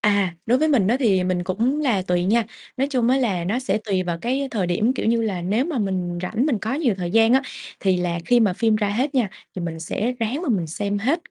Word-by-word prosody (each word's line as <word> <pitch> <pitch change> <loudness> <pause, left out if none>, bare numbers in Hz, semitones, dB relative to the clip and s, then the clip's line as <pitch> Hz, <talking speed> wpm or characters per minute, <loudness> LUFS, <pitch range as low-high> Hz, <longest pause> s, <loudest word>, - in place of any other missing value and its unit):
À, 200 -4 +2
đối 245 +3 +3
với 310 +1 +2
mình 235 -10 +3
á 240 - +3
thì 195 -7 +3
mình 180 -1 -1
cũng 235 +10 0
là 240 -10 +1
tùy 180 -1 0
nha. 225 +4 +2 0.3
Nói 270 +2 0
chung 250 -4 +1
á 260 - +4
là 200 -10 0
nó 205 +7 0
sẽ 215 -5 -1
tùy 190 -3 0
vào 175 -2 -3
cái 265 +6 -1
thời 195 -5 -1
điểm. 210 +8 +1
Kiểu 260 - -3
như 230 0 +2
là, 195 -5 -2
nếu 210 +9 +1
mà 315 -6 -2
mình 185 -4 -2
rảnh, 220 +9 0
mình 265 -8 +1
có 220 +5 -2
nhiều 275 -8 +1
thời 180 -2 -4
gian 225 +3 +4
á 265 +2 +4 0.4
thì 190 -2 +2
là 175 -1 -1
khi 245 +4 +4
mà 210 -5 +3
phim 220 +3 +2
ra 210 -1 0
hết 255 +8 -1
nha 240 -7 +2 0.3
thì 180 - -3
mình 165 -1 -5
sẽ 210 +8 -2
ráng 240 +8 -1
mà 350 - -3
mình 190 -9 +1
xem 205 +5 -2
hết 285 +11 -1
215 Hz, 270 wpm, -22 LUFS, 185-250 Hz, 0.4 s, á